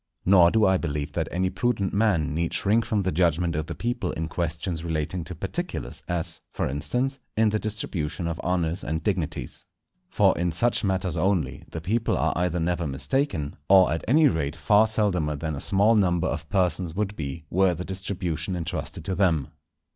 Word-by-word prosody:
Nor 90 -2 +7
do 110 +2 +3
I 95 0 +4
believe 75 -4 -3
that - - -1
any 90 +1 0
prudent 100 0 0
man 100 -8 +2
need 85 +1 -1
shrink 110 +3 +2
from 105 -2 0
the 95 - 0
judgment 85 0 +1
of 80 +1 -2
the - - -5
people 120 0 -2
in 80 0 -3
questions 85 +1 -3
relating 80 +1 -2
to 90 - -7
particulars, 160 - -4
as, 85 -1 -2
for - - -1
instance, 125 - -1 0.2
in 110 0 +4
the 110 +1 0
distribution 85 -7 -3
of 85 -1 -3
honours 85 -1 -1
and 80 +1 -3
dignities. 85 - -2 0.5
For - - +3
in 85 -1 -1
such 115 +9 +1
matters 95 -3 0
only, 80 -7 0
the 80 - -6
people 110 +6 0
are - - +1
either 90 0 0
never 85 0 0
mistaken, 75 - -1
or 95 -3 +7
at 80 - -3
any 150 +5 +5
rate 80 - -1
far 105 +8 +4
seldomer 90 -9 0
than 80 +2 -3
a 70 - -6
small 100 +3 +3
number 90 -6 +2
of - - -3
persons 90 -3 0
would 105 0 -1
be, 75 0 -5
were 95 -1 +3
the 90 +3 -5
distribution 95 -3 -3
entrusted 80 -1 -4
to 95 - -1
them. 85 -8 +1
90 Hz, 185 wpm, -25 LUFS, 80-100 Hz, 0.5 s, Nor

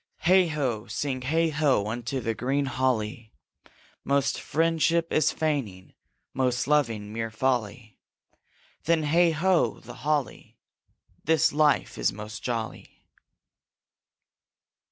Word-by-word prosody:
Heigh 185 +1 +5
ho! 130 -9 -2
sing 130 +4 -3
heigh 160 +5 +1
ho! 145 -8 +2
unto 120 +4 -3
the 115 -1 -1
green 135 +5 -1
holly 120 -4 -2 0.7
Most 140 -1 +1
friendship 165 +2 +1
is 155 - +3
feigning, 130 -13 -3 0.4
most 125 -1 0
loving 115 -8 0
mere 115 0 -3
folly; 110 -2 -2 0.9
Then, 165 -1 +2
heigh 170 +4 +4
ho, 165 - +1
the 120 - -11
holly! 150 -1 -2 0.7
This 160 -1 +3
life 150 0 +2
is - - +2
most 105 +2 -8
jolly 115 -3 -5
135 Hz, 110 wpm, -26 LUFS, 115-155 Hz, 0.9 s, Heigh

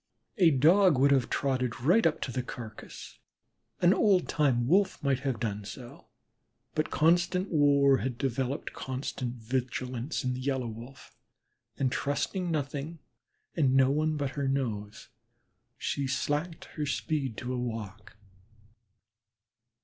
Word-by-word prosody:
A 175 -3 +7
Dog 165 +4 +5
would 140 +2 +4
have 130 -4 +2
trotted 130 -4 -1
right 175 - +4
up 155 - -2
to 130 - -3
the 125 - -2
carcass, 115 -3 -9 0.6
an 175 +1 +6
old 195 -4 +3
time 130 -6 +1
Wolf 190 +3 +2
might 135 -2 +1
have 130 -4 -2
done 105 -2 -3
so, 120 +4 -10 0.7
but 155 - -1
constant 175 +4 +2
war 140 -3 +4
had 130 -3 -3
developed 135 +1 -2
constant 130 -1 -4
vigilance 125 +2 -3
in 125 0 0
the 125 - -5
Yellow 130 -1 -1
Wolf, 115 +4 -10 0.6
and 130 -2 0
trusting 175 +7 -1
nothing 150 +1 -3 0.6
and 135 -5 +2
no 135 0 +5
one 155 +1 0
but 140 -2 -2
her 140 -1 -2
nose, 110 -6 -3 0.7
she 140 -1 -2
slacked 145 +5 -2
her 150 -1 -1
speed 140 -4 -2
to 125 +1 -4
a 125 - -2
walk. 110 -3 -6
135 Hz, 135 wpm, -29 LUFS, 125-150 Hz, 0.7 s, A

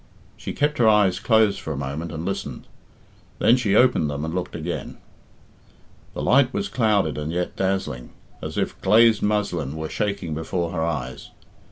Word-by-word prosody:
She - - -6
kept 150 -1 0
her 115 -2 +6
eyes 100 -4 +3
closed 110 -1 +3
for 80 - -6
a - - -6
moment 70 +5 -4
and 80 0 -5
listened; 100 - -4 0.7
then 120 - +5
she 110 -6 +1
opened 120 - +4
them 75 +1 -3
and 80 - -4
looked 90 0 -3
again. 85 +1 -5 1.2
The - - -3
light 130 -1 +4
was 100 -4 -2
clouded 100 - +1
and 75 +1 -3
yet 90 +1 -2
dazzling, 95 -10 -2 0.3
as - - -6
if - - -2
glazed 110 +2 +5
muslin 90 -9 -1
were 80 0 -4
shaking 100 -6 -2
before 85 +2 -2
her 80 -2 -2
eyes. 70 -6 -4
90 Hz, 170 wpm, -23 LUFS, 80-105 Hz, 1.2 s, her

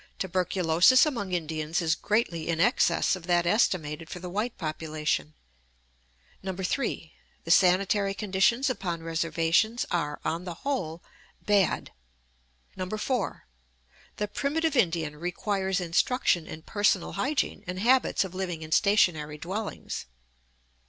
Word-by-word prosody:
Tuberculosis 185 - +4
among 235 -11 -3
Indians 160 -2 -2
is 165 -2 +2
greatly 205 -7 -1
in 165 -1 0
excess 170 0 +3
of 180 -2 -10
that 175 -1 +3
estimated 165 -5 +1
for - - -6
the 180 0 -7
white 215 +5 -2
population. 155 - -2 1.1
3. 190 - -3 0.3
The 165 - -2
sanitary 195 +2 +3
conditions 210 +6 +2
upon 185 -9 -3
reservations 165 +7 +1
are, 150 -4 -1
on 165 +2 -1
the 175 -2 -6
whole, 175 - -2 0.4
bad. 205 -3 +2 1.1
4. 250 +4 -2 0.7
The 210 - -1
primitive 295 +7 -1
Indian 165 - +1
requires 190 +3 -1
instruction 175 0 +1
in 155 - -8
personal 205 -2 +1
hygiene 270 +9 -1
and 180 +1 -4
habits 250 +3 +3
of 190 -2 -7
living 180 -4 -4
in 155 - -10
stationary 160 -6 +3
dwellings. 190 - -5
180 Hz, 120 wpm, -27 LUFS, 165-210 Hz, 1.1 s, Tuberculosis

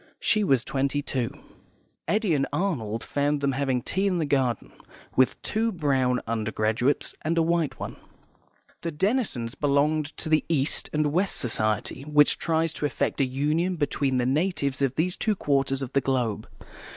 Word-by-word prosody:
She 215 -1 +2
was 135 - +3
twenty 140 +2 -1
two. 130 -5 -1 0.8
Eddy 210 -4 +1
and 135 -2 +1
Arnold 140 - -2
found 145 +1 0
them 140 -1 +1
having 130 -2 -1
tea 195 +2 0
in 185 -2 +1
the 160 - 0
garden, 135 -4 0 0.4
with 130 0 +3
two 225 +2 0
brown 135 - +1
undergraduates 110 +3 0
and 165 +2 -1
a 165 - +4
white 165 -2 0
one. - - -6 0.8
The 170 - -2
Denisons 155 - -1
belonged 145 +1 +1
to - - -3
the 155 -1 +3
East 145 -3 +1
and 150 -1 0
West 185 +3 +1
Society, 110 -1 0
which 150 0 +3
tries 165 -1 0
to 150 - -1
effect 145 - -1
a - - +4
union 150 +8 0
between 140 -4 0
the 125 - +1
natives 140 -1 0
of 135 -1 +1
these 180 +3 0
two 215 -1 +1
quarters 135 -4 0
of 125 - -7
the 140 - +3
globe. 125 -5 -1
145 Hz, 165 wpm, -26 LUFS, 130-165 Hz, 0.8 s, a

